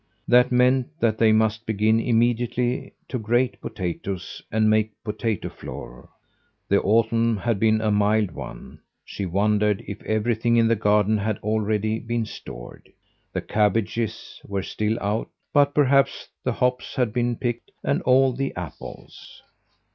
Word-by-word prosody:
That 125 +1 +5
meant 125 +1 +3
that 110 -2 +1
they 110 -1 +5
must 110 +1 +1
begin 110 +1 +2
immediately 120 +1 0
to 130 - -3
grate 115 0 0
potatoes 95 +1 -5
and 110 0 +2
make 110 0 +3
potato 110 -1 -2
flour. - - -9 0.6
The 100 - +3
autumn 115 +2 +2
had 115 0 -1
been 110 0 +3
a 110 -1 +1
mild 105 -1 +2
one; - - -9 0.3
she 100 - -5
wondered 105 +2 +1
if 100 - -7
everything 115 +2 +1
in 115 -1 +4
the 115 - +3
garden 105 0 +2
had 110 0 -1
already 110 0 0
been 115 0 -2
stored. 65 - -10 0.4
The - - -2
cabbages 110 +1 -1
were 100 -1 -3
still 110 +2 -1
out, 105 +3 -2 0.2
but 145 -1 +4
perhaps 140 -1 +2
the - - 0
hops 125 +1 -1
had 125 -6 0
been 120 0 0
picked, 120 0 -3
and - - 0
all 130 0 +4
the 135 +2 -3
apples. 85 -4 -10
110 Hz, 145 wpm, -24 LUFS, 105-120 Hz, 0.6 s, That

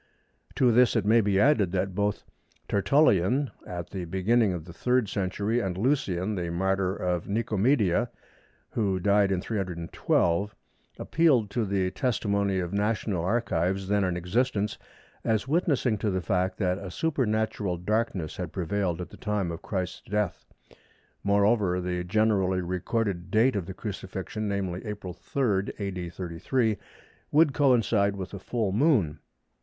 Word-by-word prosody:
To 125 -2 +4
this 125 +1 +4
it 110 -4 +1
may 115 +2 +5
be 100 -2 +2
added 105 -8 +4
that 95 0 -1
both 105 +2 -1 0.4
Tertullian 125 - +3 0.2
at 85 -1 -6
the 95 -3 -4
beginning 100 +5 +2
of 85 -3 -5
the 85 - -10
3rd 125 +3 +1
century 100 +4 -1
and 95 -5 -2
Lucian, 105 -5 0
the 90 -4 -3
martyr 95 +2 0
of 90 -3 -2
Nicomedia, 110 -1 +2 0.6
who 100 -4 0
died 100 +1 +3
in 90 -2 0
312, 90 -1 -1 0.4
appealed 135 -11 +2
to 115 0 0
the 95 -2 0
testimony 100 -6 0
of 90 -1 -2
national 105 -3 0
archives 95 -3 0
then 105 -1 +2
in 90 -2 0
existence, 105 +3 0 0.5
as 110 +2 0
witnessing 140 - +1
to 105 - 0
the 95 -1 0
fact 95 +1 0
that 90 -2 0
a 95 - -7
supernatural 110 - -1
darkness 95 -3 -1
had - - -4
prevailed 90 -1 -1
at 85 - -6
the - - -12
time 105 -5 -1
of 85 - -6
Christ's 95 -3 -3
death. 105 -3 -1 0.8
Moreover, 100 -2 +3
the 90 0 -2
generally 95 -1 +2
recorded 90 +1 -2
date 115 +4 +3
of 95 -5 -2
the 95 - -7
Crucifixion, 100 +1 -5
namely, 95 -3 -2
April 105 -5 -6
3, 100 -1 -1
A.D. 95 -4 -4
33, 95 +7 -1 0.5
would 150 -1 +5
coincide 115 -8 +3
with 95 0 -6
a 100 - -5
full 110 0 -1
Moon. 105 - +2
100 Hz, 145 wpm, -27 LUFS, 90-110 Hz, 0.8 s, may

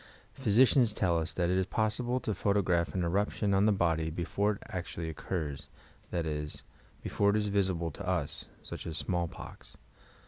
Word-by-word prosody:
Physi 110 +5 +5
cians 120 -4 +4
tell 85 -4 +2
us 80 0 -2
that 90 -1 +1
it 95 - +3
is 95 - 0
possible 120 +4 0
to 110 - -1
photograph 90 -5 +1
an 90 - +1
eruption 100 +3 +1
on 100 +2 +4
the - - +5
body 80 -5 +1
before 100 +6 0
it 100 - -10
actually 85 -2 -4
occurs, 75 -3 -4 0.4
that 85 -2 -1
is, 75 -1 -3 0.4
before 100 - +2
it 100 - +3
iB 105 -1 +1
visible 90 -5 +1
to - - -8
us - - -1 0.2
(such - - -7
as 80 - -3
smallpox). 85 -2 -4
90 Hz, 175 wpm, -31 LUFS, 85-105 Hz, 0.4 s, Physi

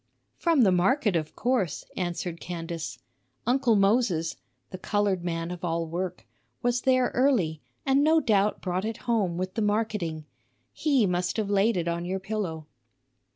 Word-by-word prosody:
"From 330 -5 +3
the 195 - +5
market, 210 +4 +2
of 155 -2 -2
course," 240 - 0
answered 175 -1 -3
Candace. 165 -7 -5 0.5
"Uncle 245 -1 +3
Moses" 195 -5 +2 0.4
(the 185 - -7
colored 200 -3 0
man 165 0 -2
of 180 0 -7
all 165 -1 -1
work) 175 +2 -4 0.4
"was 245 0 +1
there 255 -1 +3
early, 215 - +2 0.2
and 275 +1 +4
no 320 +1 +5
doubt 210 -6 +2
brought 185 0 -1
it 225 0 -3
home 210 -8 +1
with 185 +1 -3
the 225 - -2
marketing. 205 -7 -1 0.5
He 275 -8 +2
must 180 +1 -1
have 210 -2 -1
laid 205 +2 +3
it 170 -1 -1
on 170 0 -1
your 185 +2 -2
pillow." 190 -6 -4
190 Hz, 155 wpm, -27 LUFS, 170-230 Hz, 0.5 s, the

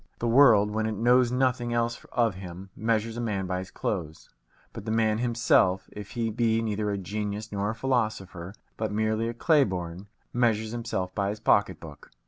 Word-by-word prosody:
The 120 - -2
world, 115 -5 +6
when 110 +1 -1
it 110 - -2
knows 120 +2 +4
nothing 125 -2 0
else 115 0 -1
of 115 -4 +2
him, 95 +1 -9
measures 115 0 -1
a - - -2
man 100 -5 -2
by 90 0 -2
his 95 0 -7
clothes; 80 -6 -4 0.4
but - - -7
the - - -4
man 110 -1 +2
himself, 115 -6 +2
if 105 -1 -9
he 115 -2 -1
be 115 0 +1
neither 105 -2 -1
a 100 - -1
genius 105 +2 -4
nor 100 0 -1
a 110 - -3
philosopher, 110 -7 -2 0.2
but 110 -2 -2
merely 110 +2 0
a 120 - -5
clay 150 +3 +4
born, 90 -2 -5 0.3
measures 110 -3 +1
himself 105 -6 -3
by 100 0 -1
his 105 +1 -4
pocket - - +2
book. - - -12
110 Hz, 190 wpm, -27 LUFS, 100-115 Hz, 0.4 s, world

